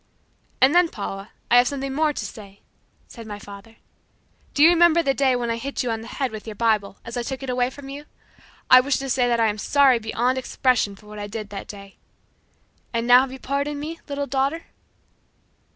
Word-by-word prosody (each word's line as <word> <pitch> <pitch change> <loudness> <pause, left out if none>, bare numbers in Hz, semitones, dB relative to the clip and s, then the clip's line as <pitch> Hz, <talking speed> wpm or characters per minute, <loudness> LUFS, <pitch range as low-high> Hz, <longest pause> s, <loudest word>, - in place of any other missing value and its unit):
"And 265 +3 +6
then, 350 -1 +4
Paula, 200 -3 -6 0.2
I 245 - +7
have 245 0 +5
something 275 0 -3
more 305 +2 +2
to - - -5
say," 200 -3 -11 0.5
said 230 -2 -11
my 205 -1 -6
father. 205 +2 -12 0.8
"Do 285 - +4
you 325 - +9
remember 340 -1 +5
the 275 - +1
day 270 -2 +2
when 240 -1 -2
I 230 - -2
hit 275 +3 -3
you 245 - -1
on 225 0 -3
the 225 - -10
head 265 +1 -3
with 215 0 -9
your 215 - -6
Bible 210 -3 0
as 230 +2 -6
I - - 0
took 265 +2 -5
it 260 - -3
away 250 0 +1
from 270 +1 -11
you? 285 +2 -8 0.6
I 255 - +9
wish 275 +2 +1
to 270 -1 -4
say 250 -1 +2
that 235 -1 +1
I 225 - +4
am 215 -1 -1
sorry 270 0 +4
beyond 240 +4 -1
expression 250 -5 0
for 205 - -19
what 210 0 -10
I 205 - -5
did 210 -1 -7
that 200 -1 -7
day; 200 -1 -11 0.9
and 230 0 -1
now 245 +1 +8
have 265 -1 -3
you 265 - -8
pardoned 280 +2 -3
me, 320 +3 -6
little 285 0 -2
daughter?" 275 +5 -1
250 Hz, 220 wpm, -23 LUFS, 220-275 Hz, 0.9 s, you